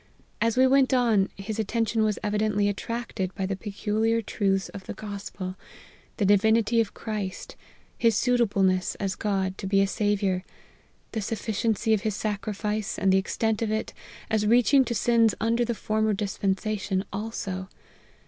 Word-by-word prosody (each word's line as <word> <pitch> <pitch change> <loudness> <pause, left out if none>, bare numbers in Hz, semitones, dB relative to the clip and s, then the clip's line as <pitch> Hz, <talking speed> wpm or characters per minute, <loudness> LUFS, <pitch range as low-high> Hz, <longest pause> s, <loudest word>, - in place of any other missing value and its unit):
As 230 +1 +1
we 260 - +6
went 265 0 +4
on, 225 -6 +3
his 210 +2 -5
attention 225 +1 0
was 215 -1 +1
evidently 210 -1 +1
attracted 205 -2 -3
by 195 - -2
the 195 +1 -2
pecu 210 +1 -3
liar 225 +1 +2
truths 195 -2 0
of 190 -2 -10
the - - -5
Gospel 200 -3 -6 0.6
the 205 - +1
divinity 220 +3 +4
of 220 - -4
Christ 210 -4 -5 0.4
his 230 -2 +3
suitableness, 200 -7 +2
as 195 -2 -2
God, 190 -2 -1
to 195 - -4
be 195 0 +3
a 195 - +4
Saviour 195 -2 0 0.7
the 220 - -2
suf 220 +2 -3
ficiency 220 0 +1
of 215 - +2
his 215 -2 -1
sacrifice, 210 0 -2
and 190 -1 +3
the 190 - +5
extent 220 +3 -1
of 225 - 0
it, 220 0 -2 0.4
as 215 -1 +2
reaching 245 +4 +5
to 235 0 -2
sins 230 -1 +3
under 230 +2 +2
the 235 0 -1
former 215 0 0
dispensation 195 0 -1
also. 195 -3 -4
210 Hz, 160 wpm, -26 LUFS, 195-225 Hz, 0.7 s, we